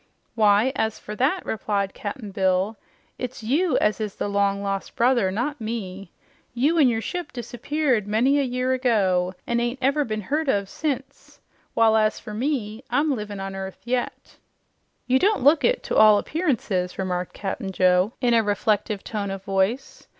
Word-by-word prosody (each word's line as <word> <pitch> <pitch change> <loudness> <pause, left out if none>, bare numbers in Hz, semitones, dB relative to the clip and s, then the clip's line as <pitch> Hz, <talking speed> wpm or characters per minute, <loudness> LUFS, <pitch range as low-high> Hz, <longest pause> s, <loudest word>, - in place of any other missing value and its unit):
"Why, 215 +3 +4
as 220 -1 -1
fer 210 - -8
that," 300 +9 +1
replied 200 -2 -2
Cap'n 210 0 -6
Bill, 190 +1 +1 0.4
"it's 250 -2 -5
YOU 290 +6 +2
as 210 +1 +1
is 210 -2 -4
the - - -2
long 200 0 +1
lost 195 -1 -3
brother, 240 -5 +3
not 245 +8 -3
me. 200 -4 -5 0.4
You 295 +7 +2
an' 285 - +6
your 225 -2 +1
ship 355 +8 -5
disappeared 245 -1 -1
many 250 +7 +3
a - - +2
year 255 0 0
ago, 190 -8 +1
an' 235 0 0
ain't 240 +2 -2
never 275 +3 +2
been 215 -4 -3
heard 295 +8 -1
of 200 -5 +1
since, 275 -3 -5 0.4
while, 225 -1 +4
as 215 -1 +2
you 210 0 -6
see, 245 -5 -2
I'm 290 -1 +1
livin' 210 -3 -6
on 195 0 -5
earth 190 0 -7
yet." 245 0 -3 0.7
"You 255 +1 +3
don't 405 - +2
look 290 +3 +5
it - - +2
to - - -3
all 215 -1 +7
appearances," 215 - -1
remarked 180 -2 -3
Cap'n 195 0 -4
Joe 185 +3 +3
in 245 -2 +3
a 230 - +5
reflective 210 0 0
tone 205 -3 -3
of 195 0 -5
voice. 195 +7 -1
220 Hz, 170 wpm, -24 LUFS, 200-260 Hz, 0.7 s, all